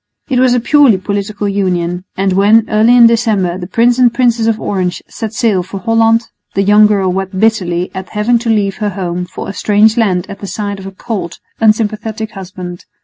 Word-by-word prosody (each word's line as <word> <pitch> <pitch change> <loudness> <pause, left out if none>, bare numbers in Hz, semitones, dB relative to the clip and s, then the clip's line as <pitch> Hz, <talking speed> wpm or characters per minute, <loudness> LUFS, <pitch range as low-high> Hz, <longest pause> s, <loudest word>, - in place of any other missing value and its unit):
It 255 -3 +1
was 255 -1 +3
a - - +2
purely 265 -3 +4
political 205 +2 -3
union; 180 -3 -2
and 190 0 0
when, 210 +4 +4
early 220 +3 +4
in 235 - +8
December, 215 -6 +1
the 175 - -6
Prince 235 +5 +2
and 245 -2 +5
Princess 235 -2 +1
of 225 -1 0
Orange 185 -4 -3
set 220 -2 -6
sail 220 -5 +1
for 190 +2 -7
Holland, 225 +3 +2 0.3
the 195 - +2
young 210 +1 +5
girl 195 -3 +1
wept 190 0 -4
bitterly 185 -5 0
at 190 0 -7
having 225 +3 +1
to 235 0 -4
leave 205 -3 0
her 210 -1 -2
home 180 -2 -4
for - - -8
a 195 - -5
strange 210 +3 +2
land 190 -6 +1
at 200 - -9
the 200 - -7
side 200 -1 -4
of 190 - -8
a - - -7
cold, 195 -4 -5 0.2
unsympathetic 220 0 0
husband. 180 -2 -9
210 Hz, 205 wpm, -13 LUFS, 190-225 Hz, 0.3 s, in